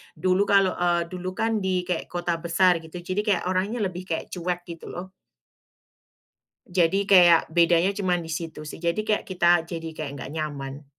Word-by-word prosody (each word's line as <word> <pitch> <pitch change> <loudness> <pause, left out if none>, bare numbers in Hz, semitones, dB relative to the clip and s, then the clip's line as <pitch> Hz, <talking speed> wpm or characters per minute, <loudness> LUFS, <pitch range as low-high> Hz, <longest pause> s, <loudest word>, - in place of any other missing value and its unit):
dulu 185 +5 +1
kalo, 195 -2 +4
eee, 175 -1 +2
dulu 185 0 -5
kan 225 -1 0
di 185 -2 0
kek 180 -2 -3
kota 175 -1 -2
besar 175 +1 +3
gitu 160 +1 -14
jadi 185 +3 -1
kayak 200 -4 +1
orangnya 195 +6 -1
lebih 185 -1 -4
kek 165 - -4
cuek 175 0 -3
gitu, 170 -1 -9
loh. 185 +2 -7 1.5
Jadi 185 +2 +1
kayak 175 -4 +6
bedanya 170 +2 +4
cuman 180 -4 -1
di 165 - -7
situ 160 -2 -6
sih, 155 - -9
jadi 170 +2 0
kayak 215 -1 +1
kita 175 -2 +4
jadi 165 -2 -5
kayak 155 -2 -5
nggak 135 - -7
nyaman. 145 -2 -5
175 Hz, 175 wpm, -25 LUFS, 165-185 Hz, 1.5 s, kayak